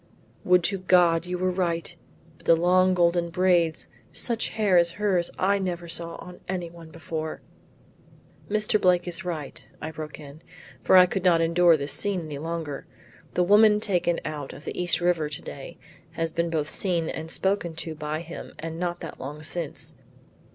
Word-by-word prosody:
"Would 180 -1 +4
to 195 +3 +2
God 175 -2 +3
you 180 0 -2
were 185 +1 0
right; 175 -2 -2 0.4
but - - -19
the 165 - +7
long 185 +2 +3
golden 170 -1 +2
braids! 175 -2 +2 0.2
Such 230 -2 -1
hair 210 -4 +1
as 170 0 +3
hers 190 -4 +1
I 200 +2 +2
never 175 -2 -3
saw 170 0 -5
on 180 0 -11
anyone 170 -3 -5
before." 160 0 -6 1.1
"Mr. 215 0 +2
Blake 180 -1 +3
is 170 -1 -4
right," 160 -6 -5 0.2
I 160 - -5
broke 155 -1 -8
in, 145 +1 -12 0.4
for 190 - +5
I 180 - +9
could 180 +1 -3
not 175 -3 +5
endure 170 0 +4
this 140 -1 -1
scene 200 -3 0
any 150 -3 -6
longer. 160 -3 -5 0.5
"The 180 - +3
woman 210 +3 +6
taken 175 -5 +1
out 150 -3 -5
of 145 - -12
the - - -5
East 180 0 +1
river 170 -4 +1
to 145 - -6
day 135 - -9 0.4
has 165 -1 -2
been 170 +1 -1
both 155 -2 -2
seen 175 -4 +1
and 160 +1 -5
spoken 190 -2 0
to 160 0 -5
by 155 0 -4
him 170 0 -9
and 165 +1 -6
that 175 -1 -2
not - - -8
long 150 +3 -7
since. 160 -1 -3
170 Hz, 180 wpm, -26 LUFS, 160-180 Hz, 1.1 s, I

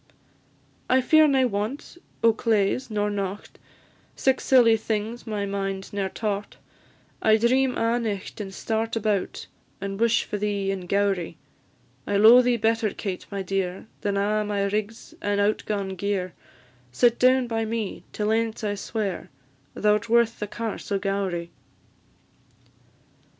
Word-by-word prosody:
"I 260 - +5
fear 310 +4 +5
nae 265 -2 +3
want 220 +8 -3 0.3
o' 230 -1 +6
claes 225 +2 0
nor 210 -1 -1
nocht, 200 0 -5 0.6
Sic 265 -1 +1
silly 240 -4 +5
things 220 +2 -3
my 210 -2 -2
mind 195 -1 -4
ne'er 195 -1 -1
taught; 205 0 -4 0.6
I 220 0 +5
dream 255 +3 +2
a' 230 +1 +1
nicht, 210 -2 -4
and 195 -2 -6
start 225 +3 -2
about, 210 -3 -1 0.3
And 195 0 -5
wish 230 0 +3
for 210 - -4
thee 200 -1 -1
in 185 -2 -5
Gowrie. 195 -4 0 0.7
I 205 - 0
lo'e 225 +4 +8
thee 245 -1 +2
better, 225 0 +1
Kate, 190 -2 -5
my 200 -1 -4
dear, 190 -1 -2 0.2
Than 200 -1 -1
a' 210 +2 +1
my 205 -1 -1
rigs 210 +3 -3
and 205 0 0
out 205 +1 +2
gaun 200 -2 -2
gear; 190 -1 -2 0.6
Sit 235 - +3
down 255 0 +4
by 225 -1 -1
me 220 -2 -3
till 210 0 -1
ance 225 0 -1
I 205 -1 0
swear, 205 -2 -4 0.5
Thou 210 0 +3
'rt 225 +2 -9
worth 235 0 +3
the 210 - -3
Carse 225 0 -5
o' 200 - +2
Gowrie." 195 -4 -2
210 Hz, 150 wpm, -25 LUFS, 200-230 Hz, 0.7 s, lo'e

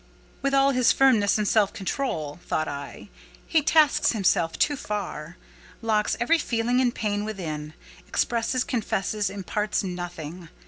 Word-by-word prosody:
"With 275 +1 +1
all 275 0 +5
his 255 -2 +4
firmness 230 -8 +4
and 210 -1 0
self 205 -1 +3
control," 190 - -3
thought 155 - 0
I, 140 +7 -7 0.4
"he 320 - +2
tasks 305 -2 +4
himself 180 -6 +1
too 290 - +2
far: 185 - -5 0.5
locks 215 -2 +1
every 325 +8 +3
feeling 245 -1 +1
and 245 -2 +1
pang 205 -1 -1
within—expresses, 165 - -3
confesses, 210 -3 -1
imparts 205 +2 -2
nothing. 175 -2 -6
210 Hz, 130 wpm, -25 LUFS, 175-245 Hz, 0.5 s, all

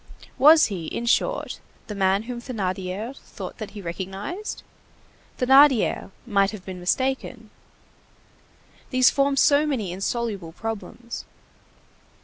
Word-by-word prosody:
Was 310 +3 +8
he, 180 -6 -4
in 235 - -4
short, 235 - 0 0.3
the 210 - -6
man 195 +1 +2
whom 240 0 -6
Thénardier 200 0 -4
thought - - -9
that 215 - -5
he 200 - -7
recognized? 195 - -5 0.7
Thénardier 265 -3 +5 0.2
might 200 -4 +2
have 205 -4 -9
been 185 -1 -7
mistaken. 245 +3 -2 1.4
These 255 -1 +5
formed 275 0 +1
so 290 +2 +4
many 225 -11 -2
insoluble 195 -2 -3
problems. 225 +3 -6
225 Hz, 115 wpm, -24 LUFS, 190-260 Hz, 1.4 s, Was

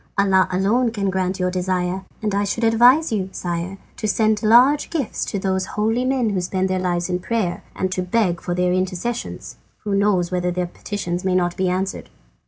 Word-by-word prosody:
Allah 195 -1 +4
alone 210 +7 +2
can 200 -4 -2
grant 185 0 -1
your 180 0 0
desire, 185 0 -1 0.2
and 210 -2 0
I 200 +1 +1
should 205 +4 -2
advise 245 +7 +5
you, 195 -4 -1
sire, 175 +2 -4 0.2
to 215 - -2
send 215 0 +2
large 250 +7 +5
gifts 300 -8 -2
to - - -3
those 190 -1 -1
holy 225 +4 +1
men 255 -4 +1
who 190 -2 -1
spend 185 +1 -1
their 185 - 0
lives 175 -1 -1
in 180 -1 -1
prayer, 200 -2 -2
and 185 -1 -2
to 185 - -1
beg 180 -2 0
for 175 - -3
their 180 0 +1
intercessions. 185 +6 -3 0.3
Who 205 -2 -2
knows 195 -3 +2
whether 180 0 0
their 180 0 -1
petitions 175 0 -4
may 185 -1 +1
not 175 -1 +1
be 185 -1 0
answered!" 185 +1 -3
190 Hz, 195 wpm, -21 LUFS, 180-215 Hz, 0.3 s, advise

